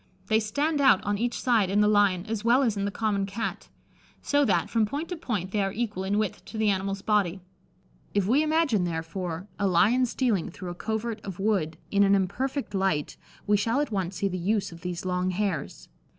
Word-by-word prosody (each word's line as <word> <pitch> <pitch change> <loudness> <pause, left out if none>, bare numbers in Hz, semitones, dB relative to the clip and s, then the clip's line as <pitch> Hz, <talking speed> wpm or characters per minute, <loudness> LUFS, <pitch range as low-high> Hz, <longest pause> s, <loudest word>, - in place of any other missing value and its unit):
They 220 0 +4
stand 285 +8 0
out 265 -9 +6
on 205 0 -1
each 240 +1 -1
side 225 -7 +2
in 200 +2 +2
the 210 - +5
lion, 200 -3 +3
as 220 -1 -3
well 245 +4 +4
as 225 -5 +1
in 200 -1 -1
the - - 0
common 200 -1 -1
Cat; 210 +4 -4 0.5
so 290 0 +2
that, 175 -7 +2
from 225 -2 +1
point 285 +10 -3
to 360 - -3
point, 210 - -3
they 210 - +1
are 195 0 0
equal 210 -3 -3
in 200 +2 0
width 215 -3 -2
to 225 - -8
the 215 -1 +3
animal's 195 0 -2
body. 200 -4 +1 0.8
If 200 -2 +2
we 255 +9 +3
imagine, 310 - +2
therefore, 165 +1 -4
a 200 - +2
lion 215 +8 +4
stealing 230 -7 0
through 175 +1 -7
a - - -5
covert 220 +3 -3
of 195 -3 -7
wood 190 -6 0
in 200 - +3
an 200 0 +5
imperfect 255 +7 -2
light, 190 -7 0 0.3
we 205 0 +3
shall 230 +6 +1
at 295 -4 -1
once 190 -2 -2
see 200 - 0
the 185 -1 -3
use 200 +3 0
of 170 0 -12
these 180 +1 -5
long 180 0 0
hairs. 185 -5 -3
205 Hz, 215 wpm, -27 LUFS, 185-225 Hz, 0.8 s, out